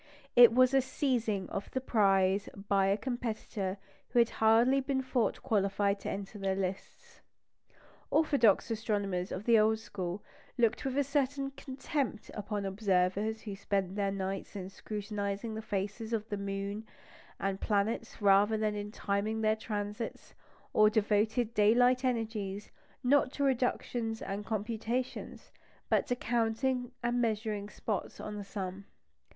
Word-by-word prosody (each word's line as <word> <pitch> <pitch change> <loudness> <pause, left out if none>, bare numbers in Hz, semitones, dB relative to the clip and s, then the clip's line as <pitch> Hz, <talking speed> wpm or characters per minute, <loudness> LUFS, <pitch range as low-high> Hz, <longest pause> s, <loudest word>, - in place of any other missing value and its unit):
It 240 -1 +10
was 255 +2 +5
a 270 - +5
seizing 245 -7 -1
of 195 - -4
the 260 - -2
prize 195 -5 +2 0.2
by 195 -1 +3
a 195 +1 +2
competitor 220 -5 -3 0.3
who - - -2
had 235 -1 +5
hardly 230 +5 +4
been 265 0 -1
thought 255 -3 0
qualified 200 -3 +1
to - - -5
enter 200 +1 -5
the 195 -1 0
lists. 195 - -5 0.9
Orthodox 265 -8 +3
astronomers 200 -5 -1
of 190 - -4
the 230 0 +5
old 220 +1 +4
school 190 -3 -5 0.3
looked 230 0 +2
with 265 0 -1
a 285 - +4
certain 275 0 0
contempt 265 -3 -4
upon 205 -1 -3
observers 195 +2 +1
who 205 -3 -5
spent 195 -1 -1
their 200 -1 0
nights 195 +1 -4
in 190 -2 -5
scrutinising 205 +1 -4
the 220 - -4
faces 210 +2 -3
of 215 -1 -1
the 205 - -1
moon 200 +2 -4 0.5
and 195 0 -2
planets 215 +2 -1
rather 205 +2 +5
than 215 -1 0
in 205 0 -5
timing 210 +2 -1
their 215 0 +3
transits, 210 +1 -5 0.4
or 215 0 +6
devoted 220 +2 +1
daylight 245 +4 +4
energies, 220 -5 -2 0.3
not 260 0 +4
to 285 - -1
reductions 245 -3 0
and 200 +1 -5
computations, 225 +3 -3 0.4
but - - +2
to 245 - +1
counting 245 +2 0
and 240 0 +1
measuring 215 -2 -1
spots 210 -1 -4
on 210 - -5
the 205 - -5
sun. 195 -1 -6
215 Hz, 145 wpm, -31 LUFS, 200-240 Hz, 0.9 s, It